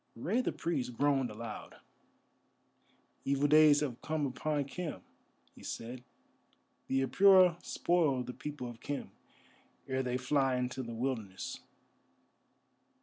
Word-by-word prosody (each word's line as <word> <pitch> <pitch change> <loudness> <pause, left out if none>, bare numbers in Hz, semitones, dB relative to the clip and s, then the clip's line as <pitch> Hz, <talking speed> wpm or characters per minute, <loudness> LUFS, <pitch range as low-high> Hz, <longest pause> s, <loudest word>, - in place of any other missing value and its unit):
Rei 190 - 0
the - - -1
Priest 140 -7 -2
groaned 140 -3 +2
aloud. 110 0 -8 1.5
"Evil 140 +1 +2
days 150 -1 +6
have 130 -6 -3
come 155 -2 -1
upon 145 +2 -1
Khem," 160 +3 -5 0.5
he - - -16
said. 120 +2 -6 0.8
"The 135 0 +1
Apura 185 0 +5
spoil 155 -8 +1
the 125 - -7
people 145 -3 -6
of 120 -1 -9
Khem 145 +2 -5 0.8
ere 130 0 0
they 125 -1 -1
fly 135 0 +1
into 125 +1 -2
the 115 -2 -6
Wilderness." 115 -6 -3
135 Hz, 120 wpm, -32 LUFS, 125-150 Hz, 1.5 s, days